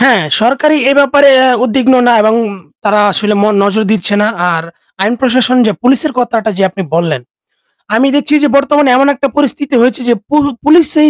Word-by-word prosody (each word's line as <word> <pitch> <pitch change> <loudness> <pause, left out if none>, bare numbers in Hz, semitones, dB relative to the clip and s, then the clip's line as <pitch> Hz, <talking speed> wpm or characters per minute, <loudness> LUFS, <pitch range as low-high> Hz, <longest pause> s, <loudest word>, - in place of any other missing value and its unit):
হ্যাঁ 245 -8 +3 0.2
সরকারি 275 +6 +1
এ - - +3
ব্যাপারে 280 0 +4
অ্যাঁ 255 -1 +2
উদ্বিগ্ন 260 +2 +1
না 240 - +4
এবং 220 +1 +1 0.5
তারা 210 0 +1
আসলে 210 +2 -1
ম - - +2 0.2
নজর 205 +2 0
দিচ্ছে 205 0 -1
না। 210 - +1 0.3
আর 165 - -3 0.4
আইন 210 +4 0
প্রশাসন 255 -1 +1
যে 215 - +1
পুলিশের 270 +3 +1
কথাটা 230 -3 -1
যে - - 0
আপনি 190 +1 -6
বললেন, 165 -5 -1 0.8
আমি 255 +5 +2
দেখছি 295 +1 0
যে - - +3
বর্তমানে 290 0 +1
এমন 275 +1 +2
একটা 275 +2 -2
পরিস্থিতি 285 0 -1
হয়েছে 255 +1 0
যে - - +4 0.2
পু 295 - -1 0.3
পুলিশেই 305 0 +3
255 Hz, 185 wpm, -10 LUFS, 215-285 Hz, 0.8 s, ব্যাপারে